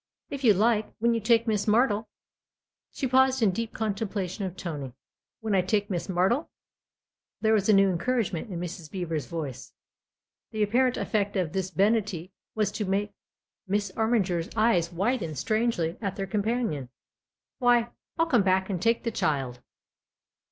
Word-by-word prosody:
" - - -61
If 280 -1 -5
you 215 -5 +6
like, 215 +2 +2
when 235 +1 +2
you 230 - +1
take 230 +1 +3
Miss 215 -3 0
Martle 220 -1 +3 0.4
" - - -65
She 275 - -2
paused 260 0 +3
in 205 - +4
deep 225 +4 -3
contemplation 200 -2 -3
of 185 -1 -6
Tony. 145 -7 -5 0.2
" - - -65
When 220 -2 -1
I 190 - +4
take 205 +2 0
Miss 175 0 -2
Martle? 190 - +1 0.5
" - - -64
There 220 0 +3
was 210 -1 +2
a - - +7
new 195 0 +6
encouragement 205 0 -1
in 175 - -4
Mrs. 175 -2 -6
Beever's 165 -7 -3
voice. 150 -6 -6 0.8
The 215 -1 0
apparent 250 +4 +2
effect 205 -2 -1
of 180 -5 -1
this 190 -1 -1
benignity 195 -3 0 0.2
was 215 -2 +1
to 210 - -3
make 200 +2 -1 0.5
Miss 200 0 0
Armiger's 195 -7 +1
eyes 215 -7 +2
widen 185 -2 -1
strangely 215 - 0
at 195 -3 -2
their 195 - -3
com 205 +2 -1
panion. 205 - -1 0.7
"Why, 240 -2 +3 0.3
I'll 330 - +3
come 250 -9 +3
back 190 0 +1
and 180 -3 -2
take 230 +3 +2
the 230 - -1
child." 135 - -1
205 Hz, 175 wpm, -27 LUFS, 180-230 Hz, 0.8 s, a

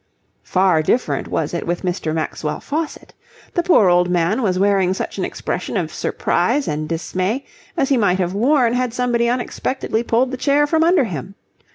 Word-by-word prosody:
Far 185 -4 +2
different 155 - 0
was 155 0 -2
it 170 - -3
with 175 +2 -2
Mr. 175 -3 -2
Maxwell 155 -1 -3
Faucitt. 310 +2 -5 0.4
The 345 - +1
poor 335 - +4
old 180 0 +3
man 180 +7 +1
was 190 -5 +1
wearing 190 -1 +2
such - - -5
an - - 0
expression - - -4
of - - -3
surprise 290 -1 0
and 155 +1 -3
dismay 185 +9 -2 0.3
as 275 -4 +1
he 275 - +3
might 200 -5 +2
have 180 -1 -1
worn 240 +2 +3
had 250 -1 -1
somebody 240 -1 +1
unexpectedly 245 -1 -2
pulled 240 +2 +1
the 260 - -4
chair 285 +2 +3
from 320 +2 +2
under 340 -2 +4
him. 185 - -6
205 Hz, 180 wpm, -19 LUFS, 180-255 Hz, 0.4 s, poor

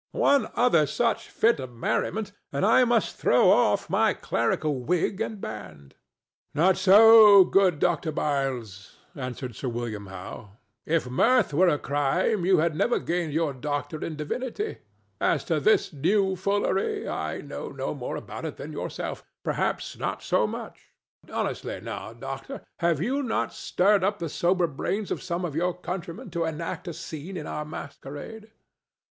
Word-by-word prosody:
One 280 -5 +3
other 170 -12 +4
such 230 +6 -1
fit 230 -8 +2
of 130 -2 -6
merriment, 205 - -1 0.2
and 140 +6 0
I 230 +4 +5
must 235 -2 +1
throw - - +4
off - - +3
my - - +2
clerical 150 -4 -1
wig 180 - -1
and 220 -2 -3
band." 80 - -8 0.6
"Not 180 +5 +4
so, 210 0 +8
good 185 -4 +3
Dr. 155 +2 0
Byles," 130 -10 -3 0.2
answered 125 -3 -6
Sir 130 - -3
William 115 -4 -5
Howe; 95 +2 -9 0.3
"if 160 -4 +1
mirth 230 - +3
were 180 +6 +4
a 150 - +3
crime, 170 +8 0
you 190 - +5
had 160 0 +1
never 240 - +2
gained 170 -3 -2
your 160 -2 0
doctorate 145 +3 -4
in 160 - -4
divinity. 255 - -4 0.4
As - - +1
to - - 0
this 425 - +2
new 190 +6 +1
foolery, 195 +1 0
I 80 0 -3
know 145 - -7
no 135 -1 -4
more 130 -4 -5
about - - -7
it - - -5
than - - -7
yourself—perhaps - - -4
not - - -3
so - - +2
much. - - -8 0.4
Honestly, - - -3
now, 110 - -7
doctor, 135 - -7 0.2
have 170 -3 +2
you 265 +9 0
not 245 -5 -1
stirred 200 +1 +2
up 200 +2 +1
the 165 - -4
sober 175 +3 +1
brains 190 +7 -3
of - - -2
some 175 0 -3
of 155 -4 -5
your 175 +2 0
countrymen 180 0 -6
to 170 -1 -1
enact 165 +3 -4
a 170 - -4
scene 165 +5 -7
in 150 - -5
our 150 - -4
masquerade?" 150 +9 -8
165 Hz, 160 wpm, -26 LUFS, 140-200 Hz, 0.6 s, so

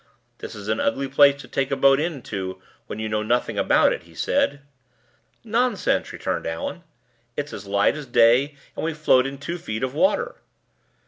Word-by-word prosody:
"This - - -8
is 105 -1 -9
an 110 0 0
ugly 135 0 0
place 140 +1 +5
to 125 - -12
take 135 +2 -1
a 140 - 0
boat 135 0 +5
into 105 - -4 0.3
when - - -6
you 110 0 -3
know 105 0 -1
nothing 120 +3 0
about - - +4
it," - - -6
he - - -19
said. 145 0 0 0.8
"Nonsense!" 235 +3 0
returned - - -3
Allan. 280 -11 -4 0.5
"It's 145 0 -3
as 100 0 -8
light 100 +5 +2
as 150 -3 -7
day, 120 +5 +4 0.2
and - - -4
we 160 -1 -1
float 135 -4 +3
in 135 0 -6
two 170 +5 -5
feet 110 -5 -4
of 130 0 -2
water." 280 - +1
135 Hz, 185 wpm, -23 LUFS, 110-150 Hz, 0.8 s, place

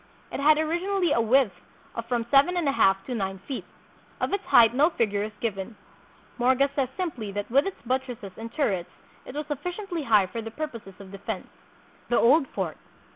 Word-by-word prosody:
It - - -4
had 300 +2 +5
originally 345 +3 0
a 235 - +3
width 235 -2 +3 0.4
of 230 0 -5
from 235 -1 0
seven 285 +6 +5
and 340 -4 0
a - - +4
half 195 -7 +3
to 255 - -4
nine 195 -4 -2
feet. 270 - -4 0.5
Of - - -1
its 400 0 0
height 230 -1 +6
no 290 +6 +4
figure 210 - 0
is 215 +1 -3
given. 215 -1 -3 0.6
Morga 260 +3 +3
says 270 -3 +1
simply 255 - -3
that 205 +2 -4
with 275 +7 +4
its 390 - -5
buttresses 250 -5 -3
and 225 +1 -7
turrets 195 - -1 0.4
it 255 - -8
was 300 +1 -3
sufficiently 350 +5 -4
high 215 -8 +4
for 205 +5 -5
the 225 - -6
purposes 230 -8 -7
of 195 -1 -11
de 195 - -9
fense. 205 -1 -4 0.6
The 240 - +3
Old 275 +4 +5
Fort. 185 -9 -4
245 Hz, 195 wpm, -26 LUFS, 210-300 Hz, 0.6 s, height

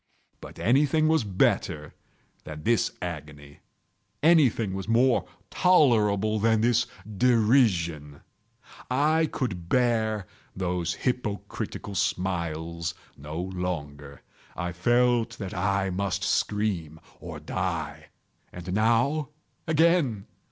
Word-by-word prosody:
But - - -11
anything 145 +6 +3
was 160 -4 +3
better 90 -6 0 0.5
than 75 -1 -8
this 115 -1 +2
agony! 75 -4 -8 0.6
Anything 135 - +4
was 95 0 -5
more 120 +2 +3 0.2
tolerable 110 - +3
than 110 0 +2
this 120 +1 +2 0.2
derision! 105 - +2 0.7
I 155 +5 +2
could 90 - -4
bear 110 -5 +1 0.3
those 90 -2 -2
hypocritical 105 -4 -4
smiles 85 -3 -2 0.2
no 75 +3 -7
longer! 80 -7 -5 0.3
I 90 -1 -3
felt 120 +4 +1
that 95 -3 -6
I 95 +1 0
must 95 0 -2
scream 100 -7 -1 0.2
or - - -8
die! - - -4 0.4
and 90 +1 -6
now—again! 145 - +1
105 Hz, 95 wpm, -26 LUFS, 90-120 Hz, 0.7 s, Anything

